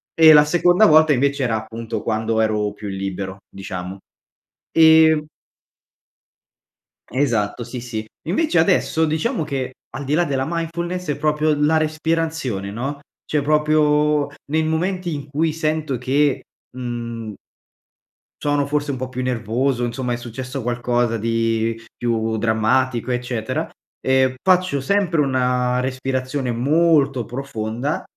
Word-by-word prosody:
E 160 -1 +8
la 150 0 +7
seconda 175 +6 +4
volta 155 -1 +6
invece 140 +1 +1
era, 115 -3 +1
appunto, 115 0 -5
quando 110 0 0
ero 105 -2 0
più 105 0 -8
libero, 95 0 -4
diciamo. 95 0 -7 0.8
Ehm 160 -1 +6 1.9
Esatto, 120 -4 0
sì, 120 +1 -7
sì. 115 -3 -5 0.2
Invece, 195 - +1
adesso 160 -1 +3
diciamo 160 +3 -1
che, 130 -3 -4 0.2
al 145 - -6
di 140 - -1
là 175 +2 +2
della 135 -3 -1
mindfulness, 170 0 -3
è - - -3
proprio 150 +1 +1
la 150 +2 +2
respirazione, 155 -9 -1
no, 135 +6 -4 0.3
cioè, 150 - 0
proprio 150 0 +2 0.2
nei 160 +1 +1
momenti 175 +2 -1
in 145 -1 -6
cui 155 +2 0
sento 155 -4 -1
che, 135 +3 +1 0.3
mhmm 115 -3 -5 1.1
sono 145 -1 +1
forse 145 0 -1
un 130 - -4
po' 130 - -4
più 130 0 -4
nervoso, 125 +1 0
insomma, 120 +1 -3
è - - -2
successo 125 +3 -6
qualcosa 120 -1 0
di 115 0 0 0.2
più 115 -2 -1
drammatico, 115 +3 +1
eccetera, 120 -2 -2 0.3
ehm, 130 0 +2
faccio 185 -6 +2
sempre 175 0 +1
una 125 -2 +1
respirazione 130 0 -2
molto 140 0 +2
profonda, 120 +2 -4
130 Hz, 130 wpm, -21 LUFS, 115-155 Hz, 1.9 s, E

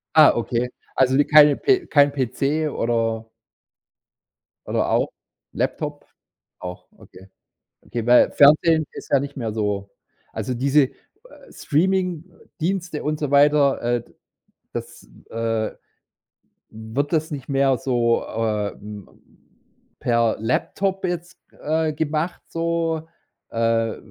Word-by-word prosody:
Ah, 155 -2 +8
okay. 120 +1 -1 0.3
Also 130 0 +3
'ne 145 - +5
keine 150 -1 +7
pe 380 -3 +2
kein 145 -1 +4
PC 140 +4 -1
oder 115 -1 -1 1.4
oder - - 0
auch - - +2 0.4
Laptop? - - -3 0.5
Auch, 90 0 -8
okay. 95 +1 -16 0.6
Okay, 115 -1 -5
weil 125 0 +6
Fernsehen 155 +2 +5
ist - - -10
ja 140 - +5
nicht 140 0 -6
mehr 115 -5 -3
so 105 -2 -2 0.4
Also, 130 - -3
diese 135 +2 +3 0.6
Streamingdienste 180 0 -2
und 150 0 -1
so 145 - -2
weiter, 145 -1 +4
äh, 120 0 0
d - - -24 0.6
das, - - -7 0.2
äh 115 -1 -1 1.0
wird 110 +7 -4
das 155 0 0
nicht 135 -3 -6
mehr 135 -1 +2
so, 120 -2 +1
äh, 110 -2 -2
hm, 105 -2 -10 0.9
per 115 -2 +2
Laptop 190 - -1
jetzt, 175 0 -4 0.2
äh, 155 +1 0
gemacht 155 +3 -2
so? 165 -1 -1 0.4
Äh, 115 -1 0
140 Hz, 115 wpm, -22 LUFS, 115-155 Hz, 1.4 s, Ah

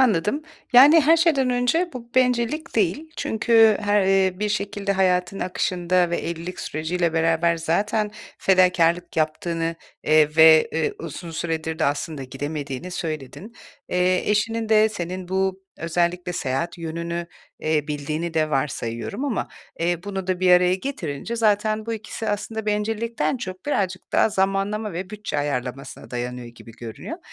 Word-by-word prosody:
Anladım. 225 - +2 0.3
Yani, 285 +7 +8
her 315 +3 +5
şeyden 305 -6 +3
önce 250 +9 +1
bu 235 -2 -9
bencillik 250 +5 +1
değil. 220 - 0
Çünkü 225 -1 +4
her, 205 0 +2 0.3
ııı, 185 +1 -4
bir 210 - 0
şekilde 205 -1 -2
hayatın 185 0 +1
akışında 180 -1 0
ve 170 - 0
evlilik 170 +2 -5
süreciyle 165 +2 -1
beraber 165 +1 +2
zaten 205 +6 0 0.3
fedakârlık 180 -2 +3
yaptığını, 165 +1 -1 0.3
eee, 155 0 +4
ve, 160 -1 +7
eee, 160 -1 0
uzun 165 +1 -7
süredir 160 0 -3
de 160 - +1
aslında 145 0 -2
gidemediğini 145 +3 -5
söyledin. 160 - -5 0.4
Eee, 180 +2 +1
eşinin 225 +2 0
de 215 0 +5
senin 185 -3 -5
bu 190 0 -1 0.2
özellikle 175 +2 -1
seyahat 135 +1 -2
yönünü, 170 +1 -4 0.3
eee, 155 -2 0
bildiğini 150 +3 -3
de 155 -1 +1
varsayıyorum 135 - -2
ama, 270 -6 -2 0.3
eee, 170 0 0
bunu 195 -2 -4
da 185 -1 -1
bir 185 -1 +4
araya 180 0 +5
getirince 190 - -4
zaten 215 0 +1
bu 230 - -2
ikisi 220 0 -5
aslında 215 +1 -3
bencillikten 220 +4 -1
çok 185 -3 -7
birazcık 185 -9 -2
daha - - +4
zamanlama 200 +1 0
ve 185 +3 -5
bütçe 210 -8 -4
ayarlamasına 135 -2 -4
dayanıyor 125 0 -4
gibi 120 0 -13
görünüyor. 115 -1 -8
180 Hz, 145 wpm, -23 LUFS, 160-215 Hz, 0.4 s, Yani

